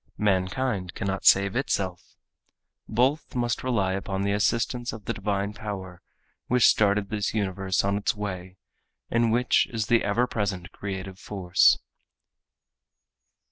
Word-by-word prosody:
Mankind 95 Hz, 0 st, 0 dB
cannot 95 Hz, 0 st, -3 dB
save 100 Hz, +1 st, +5 dB
itself. 95 Hz, -8 st, -2 dB, 0.7 s
Both 130 Hz, +8 st, +1 dB
must 120 Hz, -2 st, -1 dB
rely 105 Hz, -7 st, +1 dB
upon 95 Hz, 0 st, -3 dB
the 100 Hz, -, 0 dB
assistance 115 Hz, +4 st, 0 dB
of 110 Hz, -2 st, -9 dB
the -, -, -1 dB
divine 100 Hz, 0 st, -2 dB
power 95 Hz, -4 st, -7 dB, 0.5 s
which 125 Hz, -1 st, +4 dB
started 100 Hz, -1 st, +3 dB
this 105 Hz, 0 st, -2 dB
universe 95 Hz, -2 st, 0 dB
on 100 Hz, +1 st, +1 dB
its 100 Hz, -, 0 dB
way 95 Hz, -3 st, -6 dB, 0.5 s
and 115 Hz, -1 st, +2 dB
which 125 Hz, +2 st, +3 dB
is 110 Hz, -3 st, -2 dB
the 115 Hz, +2 st, +3 dB
ever 110 Hz, +5 st, +2 dB
present 100 Hz, -6 st, -3 dB
creative 95 Hz, -1 st, -6 dB
force. 95 Hz, -3 st, +3 dB
100 Hz, 130 wpm, -26 LUFS, 95-115 Hz, 0.7 s, save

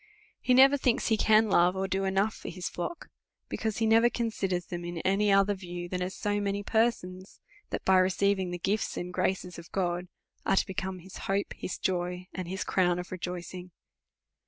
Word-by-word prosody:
He 250 Hz, -, +3 dB
never 270 Hz, +2 st, +7 dB
thinks 245 Hz, -4 st, +1 dB
he 220 Hz, -, +4 dB
can 220 Hz, +1 st, +4 dB
love, 180 Hz, -2 st, +4 dB
or 190 Hz, 0 st, -1 dB
do 195 Hz, 0 st, -1 dB
enough 195 Hz, +2 st, +1 dB
for -, -, -8 dB
his 180 Hz, +1 st, -5 dB
flock; 180 Hz, -, -5 dB, 0.4 s
because 220 Hz, -2 st, -2 dB
he 225 Hz, -, +1 dB
never 225 Hz, +2 st, +5 dB
considers 195 Hz, -7 st, -2 dB
them 175 Hz, -1 st, -6 dB
in 175 Hz, 0 st, -5 dB
any 200 Hz, +2 st, +2 dB
other 195 Hz, +1 st, +4 dB
view, 175 Hz, -2 st, -6 dB
than 180 Hz, +1 st, -3 dB
as 180 Hz, +1 st, -3 dB
so 205 Hz, 0 st, -1 dB
many 200 Hz, 0 st, -1 dB
persons, 195 Hz, -5 st, -1 dB, 0.3 s
that, -, -, -4 dB
by 190 Hz, -1 st, +5 dB
receiving 190 Hz, 0 st, +2 dB
the 175 Hz, -, -3 dB
gifts 200 Hz, +4 st, -1 dB
and 180 Hz, 0 st, -4 dB
graces 180 Hz, -1 st, -1 dB
of 170 Hz, -, -13 dB
God, 180 Hz, -1 st, -1 dB, 0.4 s
are -, -, +2 dB
to -, -, +3 dB
become 190 Hz, -1 st, -4 dB
his 185 Hz, +1 st, -11 dB
hope, 200 Hz, +1 st, 0 dB
his 180 Hz, -, -5 dB
joy, 180 Hz, 0 st, -2 dB
and 185 Hz, -2 st, -5 dB
his 190 Hz, +3 st, -3 dB
crown 180 Hz, -2 st, +2 dB
of 180 Hz, 0 st, -6 dB
rejoicing. 180 Hz, 0 st, -6 dB
190 Hz, 195 wpm, -29 LUFS, 180-205 Hz, 0.4 s, never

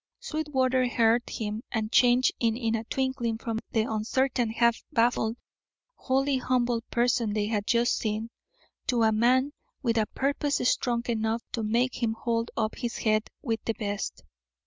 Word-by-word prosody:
Sweetwater 260 Hz, -5 st, 0 dB
heard 235 Hz, 0 st, +2 dB
him 215 Hz, 0 st, -4 dB
and 220 Hz, -1 st, -2 dB
changed 245 Hz, +1 st, +5 dB
in 230 Hz, 0 st, 0 dB
a 225 Hz, 0 st, -1 dB
twinkling 260 Hz, -3 st, -1 dB
from 225 Hz, -1 st, -3 dB
the 225 Hz, -, +2 dB
uncertain, 235 Hz, +3 st, 0 dB
half 235 Hz, +1 st, +2 dB
baffled, 235 Hz, -2 st, +1 dB, 0.6 s
wholly 270 Hz, -, 0 dB
humble 245 Hz, -2 st, +1 dB
person 235 Hz, -2 st, +1 dB
they 210 Hz, -1 st, 0 dB
had 210 Hz, -1 st, -2 dB
just 235 Hz, 0 st, +2 dB
seen, 220 Hz, +1 st, -2 dB, 0.6 s
to 240 Hz, -2 st, +2 dB
a 220 Hz, -, +4 dB
man 255 Hz, +6 st, +3 dB, 0.3 s
with 230 Hz, -2 st, +2 dB
a 215 Hz, -, +1 dB
purpose 285 Hz, +1 st, 0 dB
strong 235 Hz, -2 st, +1 dB
enough 225 Hz, 0 st, -1 dB
to 230 Hz, -, -2 dB
make 235 Hz, +4 st, 0 dB
him 225 Hz, -1 st, +1 dB
hold 230 Hz, 0 st, -1 dB
up 220 Hz, -1 st, -1 dB
his 235 Hz, -2 st, -3 dB
head 215 Hz, -1 st, +1 dB
with 225 Hz, -4 st, -2 dB
the 225 Hz, -, 0 dB
best. 205 Hz, -2 st, -4 dB
235 Hz, 155 wpm, -27 LUFS, 220-250 Hz, 0.6 s, changed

